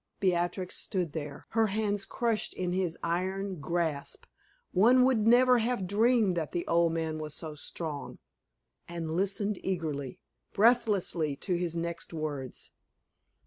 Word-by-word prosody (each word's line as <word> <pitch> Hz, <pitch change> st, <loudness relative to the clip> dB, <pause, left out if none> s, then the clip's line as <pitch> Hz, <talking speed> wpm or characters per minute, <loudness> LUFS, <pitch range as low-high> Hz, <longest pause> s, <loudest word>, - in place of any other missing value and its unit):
Beatrix 180 Hz, 0 st, 0 dB
stood 180 Hz, -6 st, -2 dB
there, 145 Hz, -3 st, -6 dB
her 225 Hz, -1 st, +2 dB
hands 205 Hz, -1 st, -1 dB
crushed 230 Hz, -3 st, -1 dB
in 180 Hz, -1 st, -2 dB
his 180 Hz, -3 st, -1 dB
iron 185 Hz, +2 st, -1 dB
grasp 160 Hz, -1 st, -2 dB, 0.5 s
one 245 Hz, +7 st, +6 dB
would 230 Hz, -5 st, +3 dB
never 250 Hz, +1 st, +6 dB
have 230 Hz, -4 st, 0 dB
dreamed 215 Hz, 0 st, +3 dB
that 160 Hz, -3 st, -3 dB
the 170 Hz, -, -1 dB
old 170 Hz, 0 st, +3 dB
man 160 Hz, -1 st, -2 dB
was 150 Hz, -1 st, -5 dB
so 155 Hz, -2 st, -5 dB
strong 150 Hz, 0 st, -6 dB, 0.7 s
and 170 Hz, -2 st, -4 dB
listened 200 Hz, +2 st, 0 dB
eagerly, 155 Hz, -8 st, -3 dB, 0.3 s
breathlessly, 205 Hz, -, +3 dB
to 180 Hz, +6 st, -2 dB
his 170 Hz, -1 st, -2 dB
next 170 Hz, 0 st, -4 dB
words. 145 Hz, -5 st, -5 dB
180 Hz, 135 wpm, -30 LUFS, 160-210 Hz, 0.7 s, one